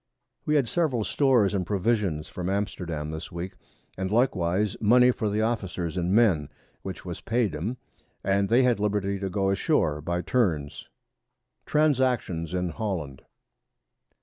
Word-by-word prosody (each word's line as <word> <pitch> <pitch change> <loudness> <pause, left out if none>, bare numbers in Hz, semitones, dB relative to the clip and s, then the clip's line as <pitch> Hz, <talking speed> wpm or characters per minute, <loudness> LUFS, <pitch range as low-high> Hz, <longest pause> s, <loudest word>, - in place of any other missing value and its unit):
We 150 - +2
had 140 -5 +3
several 140 -7 0
Stores 120 -6 +3
and 95 -2 0
Provisions 100 -5 0
from 90 0 -4
Amsterdam 85 -6 -3
this 80 +3 -7
Week, 85 +2 -5 0.4
and 95 0 -3
likewise 105 -4 +1
Money 125 +3 +6
for 110 -3 -2
the 105 +2 0
Officers 95 -7 -2
and 90 0 -1
Men, 95 -10 +3 0.3
which 95 -1 -7
was 90 0 -6
paid 115 -7 0
'em, 105 +12 -3 0.5
and 100 0 +1
they 120 +3 +5
had 125 -4 +2
Liberty 100 -1 0
to 95 0 -3
go 95 0 0
a - - +2
shoar 80 - +1
by 85 +3 -2
turns. 80 - -1 0.8
[Sidenote: 155 0 +4
_Transactions 95 -11 -1
in 90 -1 -1
Holland. 85 - -4
100 Hz, 150 wpm, -26 LUFS, 85-115 Hz, 0.8 s, Money